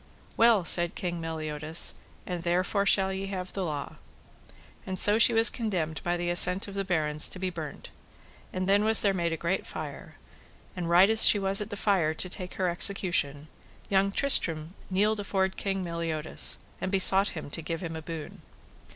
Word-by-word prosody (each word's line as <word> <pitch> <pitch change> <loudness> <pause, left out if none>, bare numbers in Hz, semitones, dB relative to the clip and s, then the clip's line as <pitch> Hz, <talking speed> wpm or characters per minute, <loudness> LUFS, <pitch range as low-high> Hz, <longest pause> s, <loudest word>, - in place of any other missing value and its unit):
Well, 225 -5 +3
said 175 0 +2
King 175 -2 -5
Meliodas, 155 0 -1 0.3
and 180 -2 -6
therefore 185 +4 -1
shall 190 -1 +3
ye 195 +1 -5
have 185 -2 -7
the 195 - -4
law. 150 -4 -6 0.9
And 190 0 -6
so 210 +4 +7
she 235 - +6
was 225 0 +5
condemned 180 -9 -4
by 175 0 -2
the 175 0 -3
assent 180 +3 +3
of 200 - -10
the 195 0 -3
barons 155 -5 0
to - - -8
be 185 0 -4
burnt; 160 -4 -9 0.6
and 185 0 -4
then 200 +1 +2
was 220 +1 +4
there 200 -2 +1
made 170 -3 -2
a 165 - -3
great 170 +4 -3
fire, - - -9 0.6
and 175 -2 -5
right 175 +3 +5
as 220 +1 +5
she - - +4
was 195 0 +2
at 210 - -6
the 205 - -7
fire 180 -7 0
to 185 - +3
take 180 -2 -5
her 185 - -2
execution, 170 -5 +1 0.4
young 195 0 +1
Tristram 170 - +2 0.2
kneeled 210 +3 0
afore 195 -2 -1
King 195 0 -5
Meliodas, 165 -2 -1 0.2
and 185 - -4
besought 195 -1 +4
him 145 -2 -9
to 165 - -5
give 165 +1 -6
him 165 -1 -6
a 160 - -7
boon. 160 -1 -9
185 Hz, 185 wpm, -26 LUFS, 165-195 Hz, 0.9 s, so